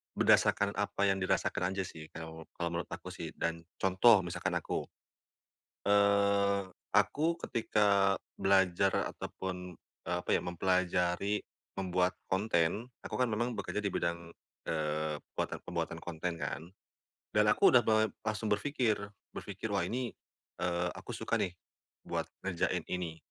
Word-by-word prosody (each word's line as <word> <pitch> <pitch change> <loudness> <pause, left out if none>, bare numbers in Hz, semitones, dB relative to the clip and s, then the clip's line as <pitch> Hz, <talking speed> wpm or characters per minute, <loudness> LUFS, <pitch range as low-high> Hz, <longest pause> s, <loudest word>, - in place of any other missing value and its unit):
berdasarkan 100 0 +4
apa 100 -1 -1
yang 95 -1 +3
dirasakan 90 0 0
aja 95 - 0
sih 80 -3 -9
kao 80 0 -8
kalau 85 0 -1
menurut 85 - -5
aku - - -7
sih. - - -7
Dan 85 0 -1 0.2
contoh 95 +2 +5
misalkan 85 -1 -2
aku, - - -2 1.0
eee, 100 0 +4 0.3
aku 145 - +2
ketika 100 -4 +3 0.2
belajar 95 0 +3 0.2
ataupun 90 -2 -6
eee, 90 - -6
apa 90 - -5
ya - - +2
mempelajari 90 +2 +1 0.4
membuat 90 -1 +1 0.2
konten 95 +1 +1 0.2
aku - - -4
kan 125 - +4
memang 120 +1 -1
bekerja 105 - -2
di 100 - 0
bidang, 85 -2 -2 0.3
eee, 75 -1 -1 0.2
puatan - - -2
pembuatan - - -3
konten 85 0 -4
kan. 80 +2 -4 0.6
Dan 105 0 +4
aku 105 - +6
udah 125 - +8
be 110 -2 +2
langsung 110 0 -1
berfikir. 115 0 +1 0.3
Berfikir, 100 +2 -5
"Wah 100 - +2
ini, 125 0 -2 0.5
eee, 90 0 0
aku - - -7
suka - - 0
nih 90 -1 -1 0.5
buat - - -2 0.2
ngerjain 90 -3 0
ini," 85 -3 -3
95 Hz, 135 wpm, -32 LUFS, 90-105 Hz, 1.0 s, udah